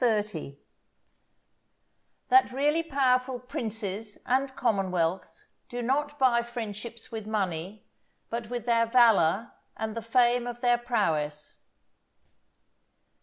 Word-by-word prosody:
—_That 210 Hz, -, 0 dB, 1.9 s
really 295 Hz, +5 st, +2 dB
powerful 260 Hz, -4 st, +1 dB
Princes 220 Hz, -4 st, -5 dB
and, 265 Hz, +1 st, 0 dB
Commonwealths 185 Hz, -5 st, -1 dB, 0.2 s
do 245 Hz, 0 st, -4 dB
not 290 Hz, +4 st, 0 dB
buy 255 Hz, -4 st, +4 dB
Friendships 235 Hz, -1 st, -7 dB
with 220 Hz, -2 st, -6 dB
Money, 195 Hz, -2 st, -3 dB, 0.5 s
but 230 Hz, -1 st, -4 dB
with 240 Hz, -2 st, -4 dB
their 230 Hz, -1 st, +3 dB
Valour 225 Hz, -4 st, +4 dB, 0.3 s
and 220 Hz, 0 st, -3 dB
the 230 Hz, -, -3 dB
Fame 240 Hz, +1 st, +2 dB
of 240 Hz, 0 st, -5 dB
their 240 Hz, -1 st, +3 dB
Prowess_. 160 Hz, -11 st, -1 dB
230 Hz, 100 wpm, -28 LUFS, 205-245 Hz, 1.9 s, buy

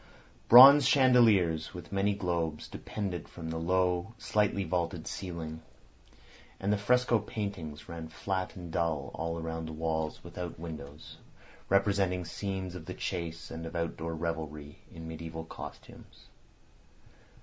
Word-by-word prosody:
Bronze 135 Hz, +3 st, +11 dB
chandeliers 115 Hz, -, +4 dB
with 90 Hz, -1 st, -9 dB
many 100 Hz, +1 st, +1 dB
globes 85 Hz, -5 st, -2 dB
depended 95 Hz, -6 st, -5 dB
from 80 Hz, -1 st, -7 dB
the 80 Hz, -, -3 dB
low, 90 Hz, +3 st, +1 dB
slightly 105 Hz, -2 st, +1 dB
vaulted 85 Hz, -1 st, -2 dB
ceiling, 80 Hz, -4 st, -5 dB, 1.0 s
and 100 Hz, +2 st, +1 dB
the -, -, +2 dB
fresco 125 Hz, +2 st, +3 dB
paintings 100 Hz, -8 st, -5 dB
ran 85 Hz, -2 st, -6 dB
flat 95 Hz, +4 st, -3 dB
and 90 Hz, -3 st, -8 dB
dull 80 Hz, -4 st, -1 dB
all 85 Hz, 0 st, -3 dB
round 80 Hz, 0 st, -4 dB
the 80 Hz, -, -6 dB
walls 80 Hz, -1 st, -2 dB
without 85 Hz, -1 st, -7 dB
windows, 75 Hz, -3 st, -9 dB, 0.5 s
representing 100 Hz, -2 st, +2 dB
scenes 95 Hz, +1 st, -4 dB
of 85 Hz, -2 st, -9 dB
the 90 Hz, -, -5 dB
chase 85 Hz, -2 st, -4 dB
and 80 Hz, 0 st, -6 dB
of 80 Hz, -, -9 dB
outdoor 85 Hz, -1 st, -3 dB
revelry 80 Hz, -2 st, -5 dB
in 80 Hz, -1 st, -9 dB
mediæval 80 Hz, 0 st, -7 dB
costumes. -, -, -11 dB
85 Hz, 130 wpm, -30 LUFS, 80-100 Hz, 1.0 s, Bronze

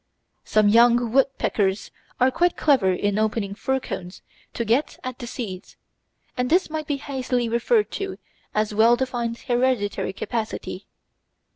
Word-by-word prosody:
Some 215 Hz, -1 st, +3 dB
young 235 Hz, +2 st, +5 dB
woodpeckers 220 Hz, -7 st, +1 dB, 0.3 s
are 255 Hz, +1 st, +4 dB
quite 350 Hz, +5 st, +1 dB
clever 260 Hz, -11 st, +3 dB
in 205 Hz, +3 st, 0 dB
opening 215 Hz, -2 st, -1 dB
fir 265 Hz, +6 st, -1 dB
cones 180 Hz, -7 st, -7 dB, 0.3 s
to 235 Hz, -, -2 dB
get 235 Hz, +7 st, +1 dB
at 255 Hz, -1 st, -6 dB
the 240 Hz, -, -6 dB
seeds, 200 Hz, -7 st, -7 dB, 0.6 s
and 250 Hz, -1 st, -1 dB
this 350 Hz, -1 st, +2 dB
might 310 Hz, -1 st, -4 dB
be 290 Hz, -, -1 dB
hastily 255 Hz, -3 st, -2 dB
referred 330 Hz, -, +1 dB
to 390 Hz, -1 st, -4 dB, 0.4 s
a 215 Hz, 0 st, +2 dB
well 225 Hz, +3 st, +5 dB
defined 240 Hz, -2 st, -2 dB
hereditary 240 Hz, -6 st, 0 dB
capacity. 225 Hz, +2 st, -4 dB
240 Hz, 140 wpm, -23 LUFS, 215-265 Hz, 0.6 s, young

